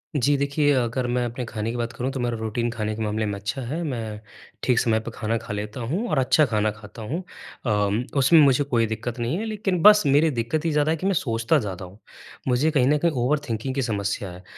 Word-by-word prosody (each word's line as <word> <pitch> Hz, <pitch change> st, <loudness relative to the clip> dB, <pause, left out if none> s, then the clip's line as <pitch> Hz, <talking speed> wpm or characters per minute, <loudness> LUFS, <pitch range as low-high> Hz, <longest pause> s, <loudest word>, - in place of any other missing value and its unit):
जी, 145 Hz, +1 st, +3 dB
देखिए, 145 Hz, +1 st, +1 dB
अगर 125 Hz, +1 st, -1 dB
मैं 125 Hz, 0 st, 0 dB
अपने 120 Hz, +2 st, -4 dB
खाने 110 Hz, -1 st, -4 dB
की 120 Hz, -, -5 dB
बात 120 Hz, 0 st, -3 dB
करूँ, 130 Hz, +2 st, -3 dB
तो 135 Hz, -, -5 dB
मेरा 120 Hz, -1 st, -1 dB
रूटीन 110 Hz, +2 st, -2 dB
खाने 110 Hz, -2 st, -3 dB
के 110 Hz, -, -6 dB
मामले 110 Hz, +1 st, -1 dB
में 105 Hz, -, -2 dB
अच्छा 110 Hz, +7 st, -4 dB
है। 150 Hz, +8 st, -3 dB
मैं 115 Hz, -8 st, -4 dB, 0.4 s
ठीक 125 Hz, -2 st, +3 dB
समय 110 Hz, -2 st, +2 dB
पे 110 Hz, +1 st, -7 dB
खाना 115 Hz, +1 st, -1 dB
खा 105 Hz, -, -6 dB
लेता 105 Hz, +3 st, -5 dB
हूँ 205 Hz, +9 st, -1 dB
और 155 Hz, -, 0 dB
अच्छा 130 Hz, +4 st, +4 dB
खाना 110 Hz, -3 st, 0 dB
खाता 105 Hz, +1 st, -12 dB
हूँ। 150 Hz, +12 st, -4 dB, 0.4 s
अम, 105 Hz, 0 st, +1 dB
उसमें 140 Hz, +5 st, +6 dB
मुझे 140 Hz, -1 st, +4 dB
कोई 120 Hz, -5 st, +1 dB
दिक्कत 110 Hz, +3 st, -4 dB
नहीं 120 Hz, +8 st, -1 dB
है, 220 Hz, -, -3 dB
लेकिन 205 Hz, -5 st, -1 dB
बस 210 Hz, +2 st, +8 dB
मेरी 145 Hz, +3 st, +4 dB
दिक्कत 130 Hz, +6 st, -2 dB
ये 165 Hz, -, +1 dB
ज़्यादा 150 Hz, +1 st, +2 dB
है 165 Hz, -, 0 dB
कि 185 Hz, -, -5 dB
मैं 195 Hz, -, +2 dB
सोचता 115 Hz, -2 st, +1 dB
ज़्यादा 95 Hz, -5 st, -5 dB
हूँ। 95 Hz, +4 st, -14 dB, 0.5 s
मुझे 130 Hz, +5 st, +2 dB
कहीं 135 Hz, -5 st, +3 dB
न 150 Hz, +2 st, +4 dB
कहीं 170 Hz, +3 st, +1 dB
ओवर 135 Hz, +2 st, +1 dB
थिंकिंग 115 Hz, +4 st, -3 dB
की 135 Hz, -, 0 dB
समस्या 100 Hz, -4 st, -2 dB
है। 90 Hz, +1 st, -12 dB
120 Hz, 245 wpm, -24 LUFS, 110-145 Hz, 0.5 s, बस